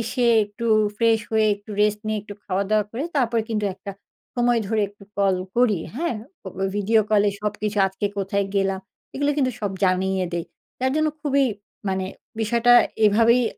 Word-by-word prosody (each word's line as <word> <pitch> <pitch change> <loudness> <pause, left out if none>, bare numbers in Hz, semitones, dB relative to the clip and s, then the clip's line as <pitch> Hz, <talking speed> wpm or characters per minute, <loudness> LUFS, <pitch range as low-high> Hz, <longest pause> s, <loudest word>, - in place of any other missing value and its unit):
এসে 240 +2 -1 0.2
একটু 205 +3 -6 0.3
ফ্রেশ 225 0 +3
হয়ে, 220 -1 +3
একটু 205 +1 -15
রেস্ট 210 0 +2
নিয়ে, 215 0 0
একটু 205 0 -9
খাওয়া-দাওয়া 200 +2 +1
করে, 245 +7 -3
তারপর 235 -4 +2
কিন্তু 210 -2 0
একটা 200 -2 -7 0.4
সময় 240 -1 +3
ধরে 220 -1 +1
একটু 205 0 -17
কল 195 -2 +3 0.2
করি। 230 -7 +3 0.2
হ্যাঁ? 335 -1 -1 0.3
ও - - -13 0.2
ওই 195 - +1
ভিডিও 220 +2 +3
কলে 210 -1 +4
সবকিছু 210 0 -2
আজকে 190 +2 -3
কোথায় 200 +1 0
গেলাম, 195 -1 +1 0.3
এগুলো 285 +1 +1
কিন্তু 260 -3 +1
সব 205 -2 -2
জানিয়ে 185 0 +1
দেই। 170 -1 -2 0.4
যার 260 +1 +1
জন্য 310 0 +2
খুবই 280 -2 +2 0.4
মানে 190 0 -1 0.4
বিষয়টা 235 +2 +3 0.3
এভাবেই 230 +4 +4
215 Hz, 170 wpm, -23 LUFS, 200-235 Hz, 0.4 s, কলে